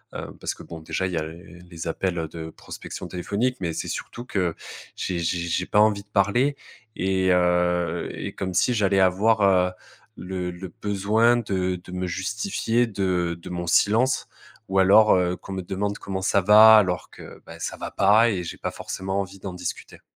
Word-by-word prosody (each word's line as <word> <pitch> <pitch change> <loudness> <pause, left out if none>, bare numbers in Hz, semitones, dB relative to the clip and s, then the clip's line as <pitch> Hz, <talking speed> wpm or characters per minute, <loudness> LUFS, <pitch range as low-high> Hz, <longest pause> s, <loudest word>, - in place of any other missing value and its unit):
Heu, - - -7
parce - - -2
que, - - -12
bon, 85 - -9
déjà, 95 +4 -2
il 90 - -5
y - - -1
a 80 - 0
les 85 +1 -10
appels 85 -1 -2
de 80 +1 -8
prospection - - -9
téléphonique. 105 +8 -2
Mais 85 -2 -1
c'est - - -4
surtout 120 - -6
que 90 -8 -1 0.4
j'ai 90 -2 -3
j'ai 85 +1 -1
j'ai 85 +2 -1
pas 105 - +2
envie 105 -1 +4
de 105 - -39
parler 110 +8 +2 0.4
et 95 0 +1
heu 90 -1 +1
et - - -6
comme 95 -2 -4
si 125 - +3
j'allais 100 -3 +2
avoir, 100 +4 +3
heu, 90 -2 +4 0.5
le 90 -1 -4
le 90 -1 -9
besoin 105 +4 +2
de 95 -5 -1
de 90 - -12
me 90 0 -3
justifier 115 - -1
de 90 -4 -1
de - - -9
mon 85 -1 -4
silence, 115 +9 +2 0.4
ou 95 0 +2
alors, 100 +3 +6
heu, 90 -1 +1
qu'on - - -11
me 95 - -3
demande: 100 +3 -3
«Comment 95 -1 -4
ça 100 - +3
va?» 110 +3 +8
alors 90 -4 +1
que, - - -12
beh, - - -11
ça - - -4
va - - -6
pas 105 +4 +4
et 90 -3 -2
j'ai - - -6
pas - - -4
forcément 95 +1 -4
envie 95 0 -8
d'en 95 -1 -6
discuter. 90 - -7
95 Hz, 195 wpm, -24 LUFS, 90-105 Hz, 0.5 s, va